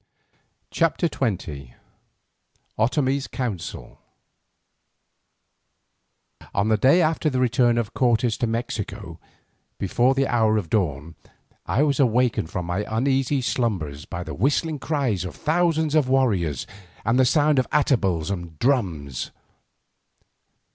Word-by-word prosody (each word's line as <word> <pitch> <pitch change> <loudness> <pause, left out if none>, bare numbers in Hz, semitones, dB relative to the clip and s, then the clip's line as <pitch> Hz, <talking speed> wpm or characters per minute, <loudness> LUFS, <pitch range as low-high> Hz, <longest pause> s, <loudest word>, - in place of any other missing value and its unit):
CHAPTER 165 +1 +1
XX 80 - -4 1.0
OTOMIE'S 130 +4 +1
COUNSEL 95 - -5 2.5
On 100 +2 +1
the 110 - +3
day 140 - +5
after 155 0 +1
the 130 -3 -1
return 120 -1 +3
of 115 -3 -2
Cortes 120 -2 +2
to 120 - 0
Mexico, 115 -2 -4 0.6
before 120 +7 +2
the 135 0 +2
hour 110 -4 +2
of 90 -7 -4
dawn 80 -6 -1 0.5
I 135 - +2
was 145 -2 +1
awakened 120 - +2
from 90 0 -4
my 90 +4 -2
uneasy 135 +4 +1
slumbers 90 - -2
by - - -5
the - - -7
whistling 150 - 0
cries 135 - -1
of 95 - -7
thousands 160 -1 +1
of 150 -5 +3
warriors 100 - +1 0.4
and 115 +3 +2
the - - +6
sound 145 +2 +3
of 130 - -1
atabals 100 - +1
and 85 -4 -6
drums. 85 - -1
120 Hz, 120 wpm, -23 LUFS, 95-135 Hz, 2.5 s, the